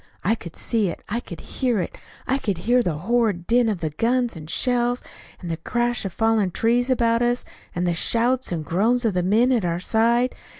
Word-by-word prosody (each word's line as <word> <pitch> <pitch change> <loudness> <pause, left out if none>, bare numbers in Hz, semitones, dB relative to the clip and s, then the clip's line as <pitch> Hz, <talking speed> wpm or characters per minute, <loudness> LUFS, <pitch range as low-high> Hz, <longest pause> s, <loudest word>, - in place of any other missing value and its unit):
I 205 - +3
could 170 -7 -7
see 220 -4 0
it. 170 - -6
I 230 +4 -1
could 170 -8 -9
hear 245 -5 -1
it. 180 - -4 0.3
I 265 +2 0
could 200 -8 -2
hear 240 +8 +2
the 170 -9 -1
horrid 210 -1 0
din 235 +1 +3
of 195 -5 -2
the 155 -2 -2
guns 240 - 0
and 155 -1 -9
shells, 245 +4 0 0.4
and 175 -2 -5
the 165 - -2
crash 240 +3 -1
of 190 - -4
falling 225 -2 +2
trees 240 +7 +1
about 230 -2 +2
us; 240 0 +1 0.3
and 175 +1 0
the 175 - +2
shouts 240 +8 +1
and 160 -3 -3
groans 230 +9 +1
of 220 - +2
the 180 - +1
men 220 +8 +3
at 235 -5 +2
our 170 -1 -1
side. 235 +5 +2
225 Hz, 215 wpm, -23 LUFS, 180-240 Hz, 0.4 s, I